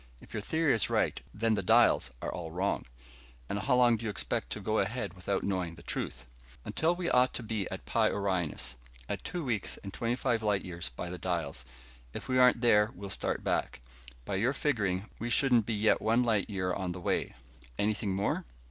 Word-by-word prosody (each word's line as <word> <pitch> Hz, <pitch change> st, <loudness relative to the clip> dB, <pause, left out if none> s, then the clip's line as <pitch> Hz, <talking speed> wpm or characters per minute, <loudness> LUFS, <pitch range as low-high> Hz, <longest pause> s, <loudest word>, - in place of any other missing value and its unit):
If -, -, -15 dB
your 110 Hz, -, -2 dB
theory 160 Hz, +6 st, +2 dB
is 110 Hz, -, +2 dB
right, -, -, +1 dB
then 115 Hz, +1 st, +1 dB
the 105 Hz, -, +1 dB
dials 90 Hz, -, +5 dB
are -, -, -2 dB
all 85 Hz, -2 st, -5 dB
wrong." 90 Hz, +1 st, -1 dB, 0.6 s
"And 100 Hz, -, -2 dB
how 125 Hz, +4 st, +2 dB
long 120 Hz, -2 st, +5 dB
do 115 Hz, -, -9 dB
you -, -, 0 dB
expect 90 Hz, -5 st, -2 dB
to -, -, -4 dB
go -, -, 0 dB
ahead -, -, -1 dB
without 95 Hz, +1 st, -2 dB
knowing 90 Hz, -4 st, -1 dB
the -, -, -14 dB
truth?" 65 Hz, 0 st, -4 dB, 0.4 s
"Until 165 Hz, +2 st, +1 dB
we 175 Hz, -1 st, -3 dB
ought 125 Hz, 0 st, +4 dB
to 120 Hz, -, -3 dB
be 110 Hz, -3 st, -2 dB
at -, -, -6 dB
Pi -, -, +2 dB
Orionis. 90 Hz, -9 st, -1 dB, 0.3 s
At -, -, -4 dB
two 175 Hz, -2 st, -4 dB
weeks 115 Hz, -6 st, -1 dB
and 100 Hz, -1 st, -7 dB
twenty 120 Hz, +1 st, -1 dB
five 120 Hz, -3 st, 0 dB
light 105 Hz, -3 st, +1 dB
years 85 Hz, -7 st, -4 dB
by 85 Hz, +8 st, -6 dB
the 90 Hz, -, -6 dB
dials, 80 Hz, -9 st, -2 dB, 0.5 s
if -, -, -6 dB
we 130 Hz, 0 st, +2 dB
aren't 125 Hz, -2 st, +6 dB
there 105 Hz, -3 st, +5 dB
we'll 100 Hz, +1 st, -7 dB
start -, -, -1 dB
back. -, -, -1 dB, 0.5 s
By 95 Hz, -, -1 dB
your 120 Hz, +7 st, +2 dB
figuring, 105 Hz, -10 st, 0 dB
we 120 Hz, -, -3 dB
shouldn't 120 Hz, -3 st, +3 dB
be 115 Hz, -, 0 dB
yet 105 Hz, +1 st, +3 dB
one 115 Hz, +3 st, +3 dB
light 110 Hz, -4 st, +1 dB
year 95 Hz, -3 st, -1 dB
on 90 Hz, -2 st, -2 dB
the 90 Hz, -, -7 dB
way. 85 Hz, -, -1 dB, 0.4 s
Anything 105 Hz, -1 st, 0 dB
more?" 100 Hz, +1 st, 0 dB
105 Hz, 210 wpm, -31 LUFS, 90-120 Hz, 0.6 s, aren't